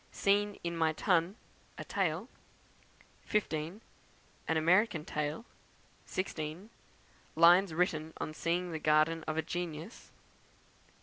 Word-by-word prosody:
Scene 205 Hz, +1 st, +1 dB
in 170 Hz, 0 st, -2 dB
my 160 Hz, -1 st, +2 dB
Tun, 180 Hz, +2 st, +1 dB, 0.4 s
a -, -, -5 dB
Tale; 185 Hz, 0 st, -1 dB, 1.0 s
15. 175 Hz, -1 st, -2 dB, 0.7 s
An 160 Hz, -, +1 dB
American 170 Hz, 0 st, +3 dB
Tale; 150 Hz, +8 st, -3 dB, 0.6 s
16. 175 Hz, +2 st, -4 dB, 0.6 s
Lines 175 Hz, +3 st, +6 dB
written 160 Hz, -2 st, 0 dB
on 155 Hz, -, -4 dB
seeing 175 Hz, +3 st, -1 dB
the 160 Hz, -, -3 dB
Garden 155 Hz, +2 st, +3 dB
of 155 Hz, -, -2 dB
a 160 Hz, -, +1 dB
Genius; 175 Hz, +3 st, -5 dB, 0.8 s
17. -, -, -31 dB
165 Hz, 115 wpm, -32 LUFS, 155-185 Hz, 1.0 s, Lines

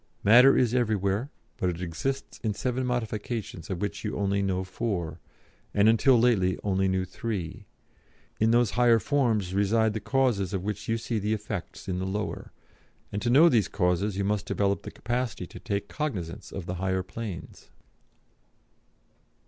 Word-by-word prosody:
Matter 125 Hz, +6 st, +7 dB
is 120 Hz, -2 st, +2 dB
everywhere, 110 Hz, 0 st, +1 dB, 0.3 s
but 90 Hz, -, 0 dB
it 85 Hz, -1 st, -4 dB
exists 95 Hz, +11 st, -4 dB
in 110 Hz, -4 st, -1 dB
seven 125 Hz, +2 st, -1 dB
modifications 110 Hz, -6 st, -3 dB
of 90 Hz, -3 st, -3 dB
which 105 Hz, +1 st, -3 dB
you 105 Hz, -, -3 dB
only 100 Hz, 0 st, +1 dB
know 95 Hz, -1 st, 0 dB
four, 95 Hz, -3 st, -3 dB, 0.6 s
and 100 Hz, +1 st, +5 dB
until 120 Hz, +3 st, +5 dB
lately 105 Hz, -6 st, +3 dB
only 95 Hz, -1 st, +1 dB
knew 95 Hz, 0 st, 0 dB
three; 100 Hz, -1 st, -5 dB, 0.7 s
in 110 Hz, -, +3 dB
those 120 Hz, -2 st, +3 dB
higher 120 Hz, +2 st, +5 dB
forms 115 Hz, -8 st, +1 dB
reside 105 Hz, +2 st, +2 dB
the 110 Hz, -, -2 dB
causes 110 Hz, -6 st, +1 dB
of 95 Hz, -, -3 dB
which 105 Hz, 0 st, -4 dB
you 115 Hz, -, +2 dB
see 115 Hz, 0 st, -2 dB
the 105 Hz, +2 st, 0 dB
effects 100 Hz, -4 st, -6 dB
in 90 Hz, -1 st, -2 dB
the 95 Hz, -, -2 dB
lower, 105 Hz, +2 st, -4 dB, 0.6 s
and 100 Hz, -, -3 dB
to 120 Hz, -, 0 dB
know 145 Hz, +8 st, +7 dB
these 115 Hz, -, +3 dB
causes 95 Hz, +2 st, 0 dB
you 100 Hz, -, 0 dB
must 100 Hz, 0 st, -1 dB
develop 100 Hz, -1 st, 0 dB
the -, -, -7 dB
capacity 120 Hz, -4 st, -3 dB
to -, -, -11 dB
take 100 Hz, -3 st, -3 dB
cognisance 100 Hz, -, -4 dB
of 95 Hz, -, -6 dB
the 90 Hz, -, -4 dB
higher 95 Hz, -1 st, 0 dB
planes.'" 100 Hz, -2 st, -8 dB
105 Hz, 165 wpm, -27 LUFS, 95-115 Hz, 0.7 s, Matter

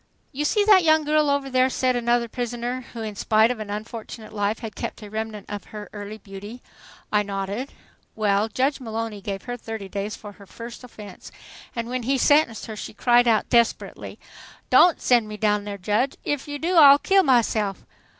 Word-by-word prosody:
"You 295 Hz, +1 st, -3 dB
see 415 Hz, +7 st, +2 dB
that 400 Hz, -4 st, +6 dB
young 315 Hz, -1 st, +4 dB
girl 300 Hz, 0 st, +2 dB
over 280 Hz, -1 st, 0 dB
there?" 255 Hz, 0 st, +2 dB
said 255 Hz, -1 st, 0 dB
another 240 Hz, 0 st, +1 dB
prisoner, 245 Hz, +1 st, -4 dB
who 230 Hz, -2 st, -5 dB
in 215 Hz, -1 st, -5 dB
spite 220 Hz, +3 st, +3 dB
of 245 Hz, -, -5 dB
an 215 Hz, -1 st, -6 dB
unfortunate 215 Hz, +1 st, -7 dB
life 205 Hz, +1 st, -1 dB
had 220 Hz, -3 st, -8 dB
kept -, -, -6 dB
a 205 Hz, -, -10 dB
remnant 220 Hz, -2 st, -5 dB
of 205 Hz, -1 st, -6 dB
her 210 Hz, -1 st, -9 dB
early 205 Hz, +1 st, -7 dB
beauty. 205 Hz, +4 st, -10 dB, 0.5 s
I 210 Hz, -, +3 dB
nodded. 200 Hz, +5 st, -4 dB, 0.4 s
"Well, 210 Hz, -1 st, +1 dB
Judge 265 Hz, +7 st, 0 dB
Mullowny 225 Hz, -3 st, -5 dB
gave 195 Hz, 0 st, -5 dB
her 245 Hz, 0 st, -5 dB
thirty 225 Hz, -3 st, -7 dB
days 200 Hz, +2 st, -4 dB
for 205 Hz, -, -10 dB
her 200 Hz, -1 st, -16 dB
first 235 Hz, +4 st, -10 dB
offense, 210 Hz, -5 st, -11 dB, 0.4 s
and 235 Hz, -1 st, -3 dB
when 255 Hz, +1 st, -3 dB
he 270 Hz, +4 st, 0 dB
sentenced 290 Hz, -4 st, +3 dB
her, 220 Hz, -, -7 dB
she 215 Hz, -, -8 dB
cried 245 Hz, +1 st, +4 dB
out 220 Hz, -2 st, +2 dB
desperately, 235 Hz, -1 st, 0 dB, 0.5 s
'Don't 350 Hz, -2 st, +6 dB
send 240 Hz, -3 st, +3 dB
me 210 Hz, 0 st, -7 dB
down 210 Hz, -1 st, +1 dB
there, 205 Hz, -1 st, -5 dB
Judge! 210 Hz, +8 st, 0 dB
If 290 Hz, -1 st, -2 dB
you 290 Hz, 0 st, -4 dB
do, 340 Hz, +4 st, 0 dB
I'll 285 Hz, -3 st, +9 dB
kill 390 Hz, +6 st, +3 dB
myself! 225 Hz, -, +1 dB
230 Hz, 195 wpm, -24 LUFS, 210-255 Hz, 0.5 s, I'll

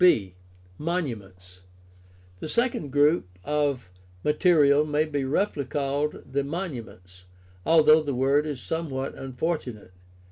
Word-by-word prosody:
b) 105 Hz, -, +4 dB, 0.5 s
Monuments. 100 Hz, -, -4 dB, 0.4 s
— 90 Hz, 0 st, -27 dB
The 155 Hz, -, -6 dB
second 235 Hz, -, 0 dB
group 145 Hz, -, +3 dB, 0.2 s
of 145 Hz, -8 st, -1 dB, 0.3 s
rriaterial 150 Hz, -2 st, +4 dB
may 150 Hz, +1 st, +2 dB
be 145 Hz, -3 st, -2 dB
roughly 150 Hz, +2 st, 0 dB
called 145 Hz, +2 st, -2 dB
the 140 Hz, 0 st, +1 dB
monuments, 120 Hz, -, -7 dB, 0.4 s
although 155 Hz, -1 st, +6 dB
the 145 Hz, -3 st, -3 dB
word 140 Hz, +4 st, +2 dB
is 145 Hz, -4 st, -4 dB
some 160 Hz, +4 st, -3 dB
what 135 Hz, 0 st, -3 dB
unfortunate. 130 Hz, -, -4 dB
140 Hz, 120 wpm, -26 LUFS, 120-155 Hz, 0.5 s, although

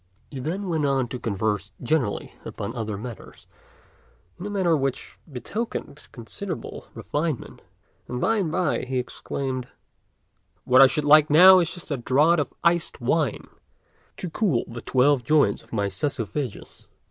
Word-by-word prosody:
He 135 Hz, -, -6 dB
then 180 Hz, +9 st, -3 dB
went 160 Hz, -4 st, 0 dB
on 135 Hz, -3 st, +1 dB
to 125 Hz, -, -5 dB
converse 105 Hz, -2 st, -2 dB
generally 125 Hz, -4 st, -1 dB
upon 115 Hz, -, -6 dB
other 110 Hz, -3 st, -3 dB
matters, 115 Hz, 0 st, -10 dB, 0.9 s
in 190 Hz, -, -5 dB
a -, -, -5 dB
manner 190 Hz, -5 st, +2 dB
which 135 Hz, -3 st, -3 dB
betokened 150 Hz, -, -5 dB
considerable 165 Hz, -, -7 dB
refinement; 150 Hz, -3 st, -3 dB, 0.5 s
and 125 Hz, -, -4 dB
by 225 Hz, -, +2 dB
and 180 Hz, -7 st, -1 dB
by 180 Hz, -3 st, 0 dB
he 130 Hz, 0 st, -3 dB
exclaimed, 130 Hz, 0 st, -4 dB, 1.0 s
"What 130 Hz, +1 st, +6 dB
I 135 Hz, -, +10 dB
should 150 Hz, +2 st, -2 dB
like 150 Hz, +1 st, +6 dB
now 185 Hz, +5 st, +9 dB
is 170 Hz, -2 st, 0 dB
just 175 Hz, -3 st, -9 dB
a 140 Hz, -, 0 dB
draught 150 Hz, +7 st, +3 dB
of 145 Hz, -, -2 dB
iced 170 Hz, 0 st, +1 dB
wine 135 Hz, +1 st, 0 dB, 0.7 s
to 185 Hz, -, -4 dB
cool 175 Hz, -, +1 dB
the 115 Hz, 0 st, -8 dB
twelve 130 Hz, 0 st, +2 dB
joints 150 Hz, +2 st, +2 dB
of -, -, -23 dB
my 105 Hz, -3 st, 0 dB
œsophagus." 115 Hz, +3 st, -4 dB
140 Hz, 150 wpm, -24 LUFS, 125-165 Hz, 1.0 s, I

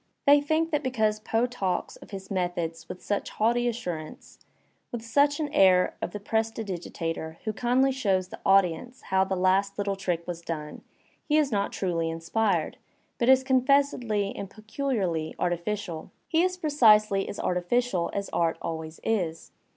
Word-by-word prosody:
They 285 Hz, 0 st, +7 dB
think 315 Hz, +3 st, 0 dB
that 295 Hz, -2 st, +1 dB
because 220 Hz, -5 st, 0 dB
Poe 225 Hz, +2 st, +1 dB
talks 195 Hz, -8 st, -2 dB
of -, -, -15 dB
his 195 Hz, -1 st, -8 dB
methods 175 Hz, -3 st, -2 dB
with 180 Hz, -, -8 dB
such 205 Hz, -, -2 dB
jaunty 240 Hz, +3 st, +2 dB
assurance, 180 Hz, -10 st, -5 dB, 0.5 s
with 230 Hz, -2 st, -5 dB
such 285 Hz, +5 st, +3 dB
an 305 Hz, -, 0 dB
air 185 Hz, -1 st, +5 dB
of -, -, -2 dB
the 210 Hz, -, -6 dB
prestidigitator 190 Hz, -7 st, -3 dB
who 215 Hz, -, -2 dB
kindly 250 Hz, +4 st, +2 dB
shows 195 Hz, -8 st, 0 dB
the -, -, -9 dB
audi 195 Hz, -3 st, +5 dB
ence 245 Hz, +10 st, -11 dB
how 190 Hz, 0 st, +4 dB
the 190 Hz, -, -2 dB
last 190 Hz, +2 st, +2 dB
Uttle 200 Hz, -1 st, -1 dB
trick 180 Hz, -3 st, -2 dB
was 175 Hz, -1 st, -5 dB
done, 155 Hz, -3 st, -6 dB, 0.5 s
he 300 Hz, -, +4 dB
is 295 Hz, -3 st, +2 dB
not 200 Hz, -2 st, 0 dB
truly 170 Hz, -3 st, -1 dB
in 165 Hz, 0 st, -4 dB
spired, 175 Hz, 0 st, 0 dB, 0.4 s
but 235 Hz, -, +2 dB
is 265 Hz, 0 st, +6 dB
confessedly 260 Hz, -6 st, +2 dB
and 200 Hz, -, -6 dB
peculiarly 215 Hz, -, -2 dB
artificial. 175 Hz, -1 st, -3 dB, 0.2 s
He 325 Hz, 0 st, +2 dB
is 365 Hz, 0 st, +1 dB
precisely 215 Hz, -, +4 dB
as -, -, -6 dB
artificial 180 Hz, +1 st, 0 dB
as 200 Hz, 0 st, -3 dB
art 165 Hz, -1 st, +1 dB
always 160 Hz, -1 st, -5 dB
is. 175 Hz, -7 st, -2 dB
200 Hz, 165 wpm, -27 LUFS, 175-245 Hz, 0.5 s, They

